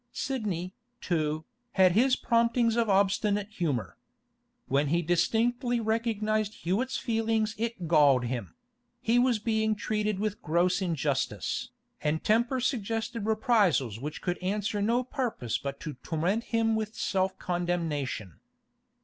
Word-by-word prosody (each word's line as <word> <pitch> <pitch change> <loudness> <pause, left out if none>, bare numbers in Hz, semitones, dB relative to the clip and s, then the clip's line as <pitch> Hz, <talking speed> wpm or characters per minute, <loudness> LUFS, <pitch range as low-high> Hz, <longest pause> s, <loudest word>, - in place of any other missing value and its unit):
Sidney, 200 -9 -3 0.3
too, 155 -2 -1 0.3
had 185 -2 +5
his 250 +7 +4
promptings 230 -1 +2
of 230 -2 +1
obstinate 200 +1 +2
humour. 135 - -2 0.7
When 140 +2 +1
he 170 +4 +1
distinctly 240 - +1
recognised 215 -1 0
Hewett's 220 +10 -1
feeling 225 -1 +1
it 230 -6 -3
galled 145 -6 +5
him; 120 - -4 0.4
he 235 +2 +2
was 245 -2 +3
being 220 0 0
treated 210 -1 -1
with 210 0 -2
gross 175 +4 +1
injustice, 150 -6 -1 0.3
and 155 +1 0
temper 235 +4 +2
suggested 225 -2 -2
reprisals 205 - +2
which 150 +4 -6
could 175 -1 -1
answer 205 +2 -1
no 235 +4 +2
purpose 240 - -2
but 140 0 -5
to 150 - -5
torment 180 +8 -1
him 225 -1 +1
with 220 0 -3
self 190 -1 0
condemnation. 165 - -2
205 Hz, 125 wpm, -29 LUFS, 165-225 Hz, 0.7 s, had